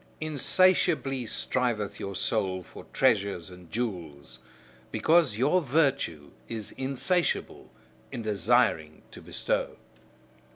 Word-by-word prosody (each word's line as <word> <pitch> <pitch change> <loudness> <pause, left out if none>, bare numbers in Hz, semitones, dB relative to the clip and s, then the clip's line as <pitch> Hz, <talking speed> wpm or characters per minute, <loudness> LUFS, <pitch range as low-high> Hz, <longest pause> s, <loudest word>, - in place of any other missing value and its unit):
Insatiably 155 -3 +2
striveth 115 -4 -2
your 100 0 -5
soul 95 -2 -1
for - - -13
treasures 95 -4 +1
and 90 -2 -14
jewels, 80 - -5 0.5
because 160 -9 +3
your 150 +9 +3
virtue 135 - 0 0.2
is 110 -3 -4
insatiable 140 +7 -1 0.4
in 120 -4 -5
desiring 105 -7 +1
to - - -11
bestow. - - -2
115 Hz, 95 wpm, -28 LUFS, 95-140 Hz, 0.5 s, because